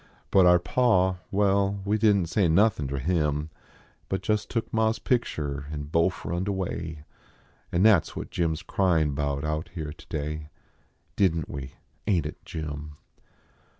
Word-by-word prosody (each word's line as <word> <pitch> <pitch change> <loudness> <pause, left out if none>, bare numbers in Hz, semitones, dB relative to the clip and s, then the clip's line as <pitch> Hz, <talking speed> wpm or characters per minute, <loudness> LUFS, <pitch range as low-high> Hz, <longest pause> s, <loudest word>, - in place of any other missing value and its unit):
But 95 -2 +6
our 90 0 +7
pa 95 0 +2
well, 100 0 +2
we 105 +2 +1
didn 105 -3 +4
t - - -4
say 95 +1 +2
nothin 90 -3 +3
ter 70 +1 -3
him, 75 0 0 0.6
But 95 0 -2
just 105 0 0
took 115 -2 -3
ma 110 0 +3
s 110 - -2
picture 75 - -1
and 75 -1 -6
bofe 85 0 +1
run 85 +3 -1
d - - -2
away; 85 -5 -3 0.7
An 85 +2 +2
that 105 -7 +6
s - - -12
what - - -6
Jim 85 -2 +1
s 80 - -7
cryin 80 -6 +2
bout 70 0 -1
out 75 +1 -2
here 75 -3 -4
today 75 0 -5 0.7
Didn 85 -5 +2
t - - -11
we, 70 -1 -6 0.3
ain 90 -7 +3
t 75 - -3
it, - - -13
Jim 75 -1 -6
85 Hz, 175 wpm, -27 LUFS, 75-100 Hz, 0.7 s, our